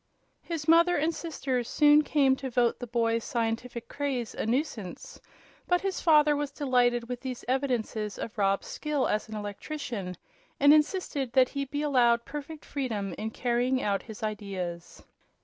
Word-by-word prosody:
His 330 -3 -5
mother 335 +2 +5
and 315 +3 +1
sisters 270 -7 -3
soon 295 0 +6
came 280 -3 +3
to 265 -1 -5
vote 240 -1 +1
the 245 - -6
boy's 230 -1 0
scientific 235 -1 -3
craze 270 -5 -3
a - - -3
nuisance; 235 - -3 0.5
but 355 0 +2
his 390 -1 -2
father 300 -3 +5
was 290 0 -2
delighted 245 -4 +1
with 250 0 -4
these 255 -2 -6
evidences 245 -5 -1
of 225 - -6
Rob's 195 -2 +1
skill 300 -3 -1
as 215 +1 -1
an 215 - -6
electrician, 205 - -5 0.4
and 285 +1 +7
insisted 300 -5 +1
that 255 -1 +5
he 280 -1 -3
be 290 +2 -3
allowed 240 -5 +3
perfect 295 +1 -7
freedom 220 -9 -3
in 220 - -2
carrying 245 +3 0
out 200 -1 0
his 220 0 -10
ideas. 195 -5 -5
250 Hz, 160 wpm, -28 LUFS, 225-295 Hz, 0.5 s, and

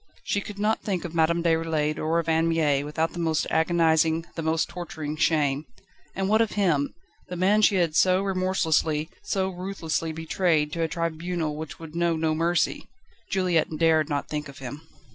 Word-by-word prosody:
She 205 - -1
could 205 0 -8
not 210 +2 +1
think 190 -4 -2
of 170 - -6
Madame 170 +1 +2
Déroulède 160 -2 +1
or 160 +2 0
of 170 - -1
Anne 165 0 +2
Mie 150 -4 +2
without 160 +2 -2
the 175 - -6
most 160 -2 +1
agonising, 160 -1 +2
the 165 - -4
most 160 0 +1
torturing 160 -4 -6
shame. 150 -2 +1 0.5
And 195 0 -1
what 215 +2 +4
of 225 - 0
him 165 -9 +1 0.3
the 180 - -6
man 195 +4 +3
she 210 -1 +4
had 170 -4 +1
so 185 +2 +4
remorselessly, 175 -4 0
so 190 -1 -1
ruthlessly 175 -3 -3
betrayed 160 -1 0
to 170 - -2
a 165 - +2
tribunal 165 -1 -2
which 155 -1 -7
would 165 -1 -10
know 170 -1 +1
no 160 0 0
mercy? 170 +2 0 0.4
Juliette 175 -5 +1
dared 160 -1 +3
not 145 -1 -2
think 150 -1 -4
of 140 - -12
him. 135 +2 -7
165 Hz, 180 wpm, -26 LUFS, 155-180 Hz, 0.5 s, what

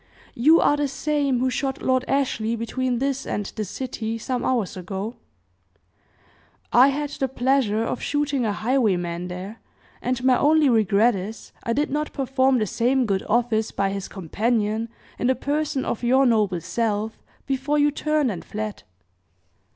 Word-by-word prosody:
"You 310 +8 +5
are 290 - +3
the 290 -1 +1
same 285 -1 0
who 260 0 +1
shot 270 +2 -2
Lord 255 -1 +2
Ashley 235 -5 0
between 245 +2 -2
this 270 +1 -1
and 205 - -3
the 215 - -4
city, 225 +1 -4
some 250 +2 -3
hours 235 -7 0
ago?" 195 +5 -5 1.6
"I 250 +3 +8
had 290 +1 -1
the 270 - -1
pleasure 250 -4 +1
of 230 - -3
shooting 290 -3 0
a 215 - +1
highwayman 195 -7 0
there, 185 +5 -7 0.4
and 250 0 -2
my 255 -1 +4
only 305 -1 +4
regret 220 0 +4
is, 200 +2 -7
I 230 - -1
did 290 +3 0
not 300 +1 -2
perform 265 -1 +2
the 215 - +1
same 250 +5 +1
good 195 -3 0
office 225 -2 +1
by 195 0 -1
his 195 -1 -4
companion, 215 +4 -1 0.3
in 245 - +1
the 260 - +3
person 290 -1 -1
of - - -2
your 260 +3 +4
noble 210 -7 +2
self, 220 +3 -2 0.2
before 275 +2 0
you 295 0 +4
turned 300 -3 0
and 180 - -6
fled." 215 0 -5
245 Hz, 160 wpm, -23 LUFS, 215-270 Hz, 1.6 s, I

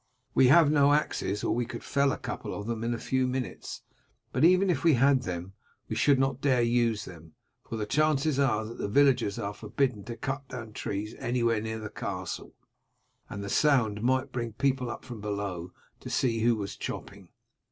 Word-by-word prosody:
We 130 - +5
have 155 +2 +6
no 145 -1 +5
axes 105 -9 0
or - - +1
we 120 -1 -1
could - - -7
fell 140 -1 +2
a - - -2
couple - - -5
of 100 - -5
them 115 0 -3
in 115 - -1
a 120 - -1
few 130 +2 0
minutes; 125 0 -4 0.5
but - - 0
even 185 +2 +5
if 145 -5 -2
we 165 -4 +5
had 135 +1 +4
them, 90 -3 -5 0.3
we - - -3
should 140 -2 +4
not 135 0 0
dare 130 -4 +3
use 115 -2 +1
them, 80 -3 -12 0.4
for - - -3
the 110 -1 -2
chances 150 +2 +2
are 120 -6 +2
that 115 +2 -9
the - - -1
villagers 130 -3 +3
are 100 +1 -3
forbidden 125 0 -1
to 115 -1 -6
cut 135 +3 -4
down 120 -4 -8
trees 105 +2 -4
anywhere 115 -2 +1
near 110 0 -4
the 110 -1 -7
castle, 95 -3 -5 0.7
and 100 - -6
the - - -5
sound 115 -5 +2
might 130 +3 +1
bring 120 -3 -3
people 130 0 0
up - - -7
from 120 -5 -8
below 100 -4 -4 0.3
to - - -8
see 115 -3 +1
who 115 +1 +3
was 100 -2 -5
chopping. - - -7
120 Hz, 200 wpm, -28 LUFS, 105-135 Hz, 0.7 s, have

